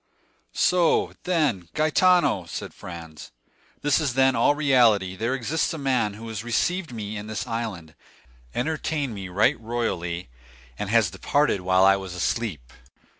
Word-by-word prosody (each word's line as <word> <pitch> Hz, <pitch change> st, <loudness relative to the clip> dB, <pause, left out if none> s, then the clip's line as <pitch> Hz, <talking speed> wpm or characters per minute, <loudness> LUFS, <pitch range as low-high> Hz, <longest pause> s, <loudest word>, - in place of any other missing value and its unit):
"So, 180 Hz, -2 st, +2 dB
then, 150 Hz, -, 0 dB
Gaetano," 155 Hz, -, +3 dB
said 80 Hz, -, -6 dB
Franz, 80 Hz, -3 st, -10 dB, 0.5 s
"this 145 Hz, +1 st, +3 dB
is, 140 Hz, -5 st, -1 dB
then, 130 Hz, 0 st, +4 dB
all 120 Hz, +5 st, +3 dB
reality; 120 Hz, -10 st, +3 dB
there 115 Hz, +6 st, -1 dB
exists 150 Hz, +6 st, -1 dB
a -, -, -5 dB
man 130 Hz, -7 st, 0 dB
who 115 Hz, +2 st, -9 dB
has 110 Hz, -1 st, -5 dB
received 165 Hz, +9 st, -1 dB
me 110 Hz, -2 st, -5 dB
in 105 Hz, +1 st, -7 dB
this 105 Hz, -2 st, -4 dB
island, 105 Hz, -9 st, -5 dB, 0.6 s
entertained 150 Hz, -1 st, -2 dB
me 95 Hz, -3 st, -7 dB
right 95 Hz, +4 st, +2 dB
royally, 95 Hz, -, -3 dB, 0.5 s
and 105 Hz, -, -3 dB
has 110 Hz, -4 st, +3 dB
departed 145 Hz, -, +1 dB
while 95 Hz, +1 st, +3 dB
I 95 Hz, 0 st, +6 dB
was 95 Hz, -2 st, -7 dB
asleep?" 90 Hz, -, -3 dB
115 Hz, 145 wpm, -24 LUFS, 95-140 Hz, 0.6 s, I